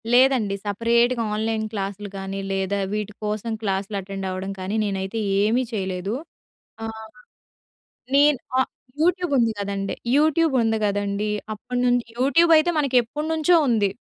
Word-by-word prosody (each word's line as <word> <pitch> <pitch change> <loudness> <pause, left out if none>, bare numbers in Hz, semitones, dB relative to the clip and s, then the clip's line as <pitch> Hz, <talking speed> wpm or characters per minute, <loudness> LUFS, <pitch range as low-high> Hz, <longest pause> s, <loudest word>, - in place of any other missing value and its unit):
లేదండి. 250 -5 +4
సెపరేట్‌గా 235 +3 +2
ఆన్లైన్ 220 0 -1
క్లాసులు 200 -1 -4
కానీ, 195 0 -5
లేదా 195 +1 -1 0.2
వీటి 210 0 -3
కోసం 215 +2 -2
క్లాసులు 200 0 -2
అటెండ్ 195 0 -6
అవ్వడం 185 +1 -4
కానీ, 190 +3 -3
నేనైతే 195 +2 -3 0.2
ఏమీ 225 +5 +2
చేయలేదు. 190 -1 -2 0.7
ఆహ్, 220 0 -7 1.1
నేను 290 -1 +5 0.2
ఆ - - +6 0.4
యూట్యూబ్ 355 -1 +2
ఉంది 230 -1 +3
కదండీ. 200 -1 -3 0.2
యూట్యూబ్ 315 0 +3
ఉంది 225 0 +1
కదండీ. 205 +1 -1 0.2
అప్పటి 245 +3 -4
నుంచి 245 -1 +2
యూట్యూబ్ 330 +7 +4
అయితే 325 +3 +3
మనకెప్పటినుంచో 300 +6 +2
ఉంది. 215 -4 +3
220 Hz, 130 wpm, -23 LUFS, 200-255 Hz, 1.1 s, ఆ